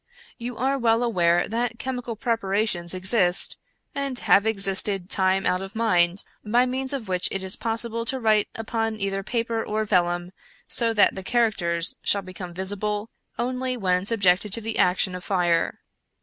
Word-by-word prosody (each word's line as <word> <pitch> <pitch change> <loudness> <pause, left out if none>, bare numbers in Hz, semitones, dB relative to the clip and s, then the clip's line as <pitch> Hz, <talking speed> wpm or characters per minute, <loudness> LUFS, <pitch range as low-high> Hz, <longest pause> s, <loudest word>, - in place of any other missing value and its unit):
You 240 0 -6
are 270 +2 0
well 230 0 +2
aware 175 -7 +2
that 230 +1 -2
chemical 245 -2 -5
preparations 200 -5 -1
exist, 185 -1 +2 0.3
and 275 -2 -3
have 205 -2 +3
existed 195 -2 +4
time 190 0 +1
out 180 +1 +1
of 195 +2 -8
mind, 185 -5 +2 0.2
by 240 +4 +2
means 260 +1 -3
of 265 -6 -4
which 180 -1 +1
it 195 - -3
is 190 0 +2
possible 230 0 -3
to 260 +2 -2
write 215 -3 +2
upon 225 -1 -3
either 195 -1 -2
paper 230 +1 -2
or 215 +1 -2
vellum, 175 -2 0 0.4
so 230 -1 +2
that 215 -2 +3
the 190 - -6
characters 185 -7 +1
shall 200 -1 +1
become 185 -1 -9
visible 205 +4 -3 0.3
only 255 +1 -2
when 185 -2 0
subjected 200 -2 +2
to 230 - +3
the 225 0 -4
action 180 +1 +2
of 180 0 -7
fire. 175 -3 0
210 Hz, 165 wpm, -24 LUFS, 185-230 Hz, 0.4 s, existed